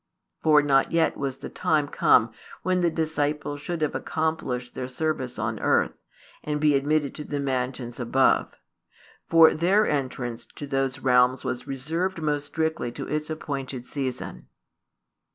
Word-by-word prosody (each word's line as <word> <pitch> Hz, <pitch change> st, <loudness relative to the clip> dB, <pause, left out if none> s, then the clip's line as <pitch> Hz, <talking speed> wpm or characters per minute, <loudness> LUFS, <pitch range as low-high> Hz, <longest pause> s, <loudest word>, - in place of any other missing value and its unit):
For 150 Hz, -2 st, +5 dB
not 135 Hz, -2 st, +3 dB
yet 165 Hz, -1 st, +2 dB
was 135 Hz, -1 st, -3 dB
the -, -, -7 dB
time 150 Hz, -2 st, +1 dB
come 115 Hz, -4 st, +4 dB, 0.3 s
when 185 Hz, -1 st, +1 dB
the 175 Hz, -, +3 dB
disciples 150 Hz, -2 st, -2 dB
should 165 Hz, +1 st, -3 dB
have 150 Hz, -, 0 dB
accomplished 140 Hz, -5 st, -2 dB
their 125 Hz, -, -4 dB
service 130 Hz, -2 st, -2 dB
on -, -, -2 dB
earth, -, -, +1 dB, 0.4 s
and 150 Hz, 0 st, -2 dB
be 150 Hz, -1 st, +4 dB
admitted 145 Hz, +1 st, +1 dB
to 150 Hz, -, -7 dB
the 145 Hz, -1 st, -4 dB
mansions 125 Hz, -2 st, -3 dB
above. 130 Hz, +2 st, +2 dB, 0.8 s
For 165 Hz, -1 st, +7 dB
their 190 Hz, +6 st, +3 dB
entrance 125 Hz, -4 st, -3 dB
to 145 Hz, -, -6 dB
those 135 Hz, -1 st, -1 dB
realms 125 Hz, 0 st, +3 dB
was 125 Hz, 0 st, -4 dB
reserved 165 Hz, +7 st, -2 dB
most 145 Hz, -2 st, -1 dB
strictly 160 Hz, -5 st, -1 dB
to -, -, -6 dB
its 150 Hz, +1 st, -2 dB
appointed 135 Hz, -5 st, -4 dB
season. 130 Hz, -3 st, -5 dB
145 Hz, 150 wpm, -26 LUFS, 130-155 Hz, 0.8 s, For